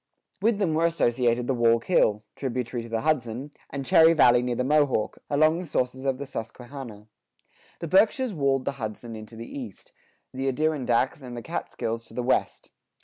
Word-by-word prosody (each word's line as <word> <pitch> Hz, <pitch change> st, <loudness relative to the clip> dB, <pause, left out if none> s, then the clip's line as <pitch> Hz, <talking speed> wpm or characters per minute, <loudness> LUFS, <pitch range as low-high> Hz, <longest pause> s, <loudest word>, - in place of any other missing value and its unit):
With 220 Hz, +1 st, +2 dB
them 190 Hz, -6 st, 0 dB
were 165 Hz, +2 st, +3 dB
associated 120 Hz, -6 st, +1 dB
the 135 Hz, -, 0 dB
Wallkill, 115 Hz, -, +2 dB
tributary 125 Hz, -2 st, -3 dB
to 115 Hz, -, -9 dB
the 115 Hz, 0 st, -1 dB
Hudson, 135 Hz, -2 st, -1 dB, 0.2 s
and 135 Hz, -1 st, -5 dB
Cherry 160 Hz, +4 st, +6 dB
Valley 125 Hz, -6 st, +5 dB
near 125 Hz, -1 st, -1 dB
the 125 Hz, -, 0 dB
Mohawk, 145 Hz, -5 st, +1 dB
along 155 Hz, +3 st, +3 dB
the 180 Hz, -, -6 dB
sources 130 Hz, -1 st, -2 dB
of 135 Hz, -1 st, +1 dB
the 140 Hz, -, -5 dB
Susquehanna. 120 Hz, -2 st, -8 dB, 0.8 s
The 170 Hz, -, -3 dB
Berkshires 220 Hz, -, +3 dB
walled 135 Hz, -4 st, +1 dB
the -, -, 0 dB
Hudson 110 Hz, +1 st, -5 dB
in 110 Hz, 0 st, -9 dB
to 115 Hz, -, -13 dB
the 115 Hz, +1 st, -7 dB
east; 120 Hz, -6 st, -9 dB, 0.4 s
the 135 Hz, +1 st, -3 dB
Adirondacks 135 Hz, -2 st, 0 dB
and 125 Hz, -2 st, -8 dB
the 120 Hz, -, -6 dB
Catskills 115 Hz, +2 st, -4 dB
to -, -, -14 dB
the 125 Hz, -, -2 dB
west. 130 Hz, -, -1 dB
130 Hz, 180 wpm, -26 LUFS, 115-150 Hz, 0.8 s, Cherry